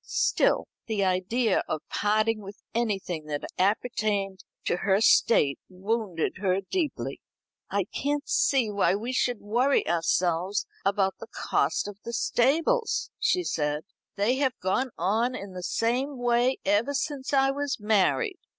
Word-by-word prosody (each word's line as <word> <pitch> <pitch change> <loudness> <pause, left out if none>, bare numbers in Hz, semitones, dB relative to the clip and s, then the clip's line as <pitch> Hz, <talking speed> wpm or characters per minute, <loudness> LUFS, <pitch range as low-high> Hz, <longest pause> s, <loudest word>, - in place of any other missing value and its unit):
Still - - +1 0.2
the 215 -3 0
idea 190 +4 +1
of 155 - -3
parting 215 +1 +1
with 200 +1 -10 0.2
anything 195 -8 -2
that 145 -1 -4
appertained 200 -1 0 0.2
to - - +1
her 190 +2 +2
state 150 -9 +4
wounded 190 -2 -2
her 185 -1 +1
deeply. 335 -6 -2 0.5
"I - - +1
can't 290 +1 -2
see 255 -6 +2
why 200 -2 +2
we 235 +5 -3
should 245 -2 +1
worry 245 +7 +2
ourselves 175 +3 +1 0.2
about 195 -1 +1
the - - -9
cost - - 0
of 205 -1 -8
the 235 - -6
stables," 320 - +1
she 465 -6 +2
said; 150 - -1 0.3
"they 215 +6 +1
have 265 -2 0
gone 225 +8 0
on 225 +8 +1
in 200 -5 -7
the 180 - -6
same 250 +9 -1
way 245 +1 +2
ever 220 +8 +2
since 275 -1 -3
I 270 -1 +4
was 285 -1 -2
married. 220 - +1
215 Hz, 140 wpm, -27 LUFS, 190-260 Hz, 0.5 s, state